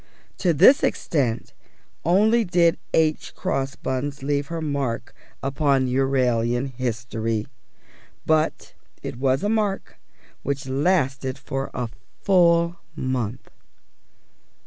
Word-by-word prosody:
To 180 - +3
this 210 - +7
extent 125 -7 -1 0.5
only 215 +7 +4
did 175 -3 +3
H. 155 -1 +1
Crossbuns 135 +1 -3
leave 145 0 0
her 165 0 -4
mark 140 -6 -2 0.3
upon 135 -1 +2
Euralian 125 -1 +1
history; 115 -3 -2 0.8
but 155 0 +1 0.3
it - - -5
was 130 +1 +1
a - - +1
mark 210 -3 -1 0.4
which 140 -1 -3
lasted 135 -2 0
for 135 0 -4
a 125 -1 -2 0.4
full 170 -2 +4 0.2
month. 130 -2 -3
135 Hz, 100 wpm, -23 LUFS, 130-165 Hz, 0.8 s, this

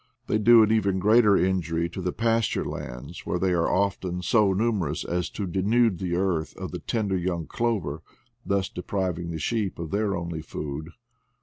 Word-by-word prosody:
They 105 - +1
do 115 +1 +7
even 105 -3 +1
greater 105 +1 +5
injury 85 -3 0
to 95 - -6
the 90 0 -1
pasture 115 -1 0
lands, - - -7
where - - -1
they 95 +1 +1
are 85 -1 +1
often 95 -2 -1
so 105 +1 +3
numerous 105 -1 0
as 90 0 -1
to 100 - -4
denude 100 +2 +2
the 90 -2 -1
earth 90 -4 -1
of - - -6
the - - -5
tender 105 -4 -1
young 85 -2 -2
clover, 90 -7 -2 0.4
thus 100 -1 0
depriving 90 -2 -3
the 85 - -3
sheep 100 +4 -1
of 85 -2 -6
their 100 -1 0
only 85 -2 -4
food. 75 0 -6
95 Hz, 175 wpm, -26 LUFS, 85-105 Hz, 0.4 s, do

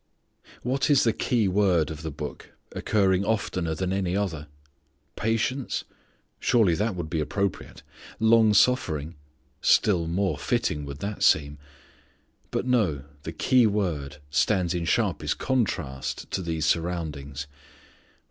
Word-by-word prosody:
What 130 +4 0
is 145 -3 +5
the 115 - +3
keyword 95 -8 +2
of 80 -1 -7
the 80 - -4
book, 75 0 -8 0.2
occurring 95 -2 +1
oftener 95 -6 -1
than 95 +2 -2
any 95 -1 0
other? 80 -7 -3 0.7
Patience? 115 +4 -1 0.6
Surely 110 -8 +3
that 105 +4 -1
would 85 -3 -4
be 80 0 -2
appropriate. 95 +6 -3 0.4
Long 110 -1 +5
suffering? 85 - +2 0.5
Still 90 -6 +3
more 90 -3 0
fitting 75 0 -1
would 70 +1 -8
that 105 0 -4
seem. 75 -1 +3 0.9
But, - - -2
no, 105 - +1 0.2
the 80 - -6
keyword 90 - +1
stands 90 +5 +2
in 85 -1 -2
sharpest 80 - 0
contrast 90 - -2
to - - -1
these 80 -3 -2
surroundings. 75 -4 -2
90 Hz, 120 wpm, -26 LUFS, 75-105 Hz, 0.9 s, is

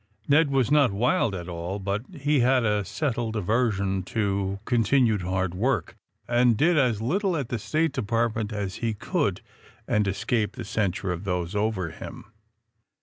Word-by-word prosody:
Ned 145 +1 +4
was 135 -1 +1
not 145 -6 +5
wild 110 0 +1
at 85 -2 -6
all, 85 +2 -4
but 100 +1 -2
he 145 -3 +1
had 125 0 +3
a 105 -1 +1
settled 115 - -2
aversion 100 -2 0
to 100 -3 -1
continued 115 -3 +2
hard 95 0 -1
work, 120 +9 -1 0.3
and 120 -1 +3
did 170 +7 +3
as 120 -7 +2
little 185 - 0
at 135 -5 -3
the 120 - -2
State 155 +10 0
Department 115 0 -1
as 100 -3 -3
he 115 -2 -2
could - - -1 0.5
and 105 -1 +2
escape 105 +3 0
the - - -7
censure 95 -2 -1
of 90 +1 -4
those 90 -2 -2
over 100 -5 -1
him. - - -9
110 Hz, 160 wpm, -26 LUFS, 100-125 Hz, 0.5 s, not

